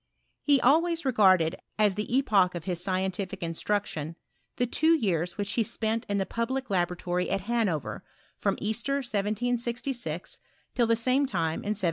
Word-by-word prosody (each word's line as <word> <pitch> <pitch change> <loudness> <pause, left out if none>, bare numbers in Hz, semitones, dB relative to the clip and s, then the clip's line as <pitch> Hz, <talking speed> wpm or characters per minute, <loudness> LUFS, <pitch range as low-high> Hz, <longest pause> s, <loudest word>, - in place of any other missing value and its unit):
He 285 -2 +4
always 330 +5 +3
regarded 185 -10 +4 0.2
as 210 -2 +3
the 210 +3 -4
epoch 195 -9 +3
of 170 - -5
his 175 0 -3
scientific 190 0 -2
instruction, 165 -2 -2 0.4
the 245 - +1
two 320 +7 +3
years 180 - -1
which 205 0 -2
he 230 - +1
spent 225 +1 -2
in 200 - +1
tlie 195 -2 -1
public 255 +2 -2
laboratory 180 0 0
at 195 0 0
Hanover, 205 - -1 0.4
from - - 0
Easter 230 +6 -1
1766, 235 - -2 0.3
till 240 -2 +2
the 230 - +4
same 255 +5 +2
time 165 -7 -1
in 210 +1 -2
1768. - - -9
210 Hz, 155 wpm, -28 LUFS, 180-240 Hz, 0.4 s, He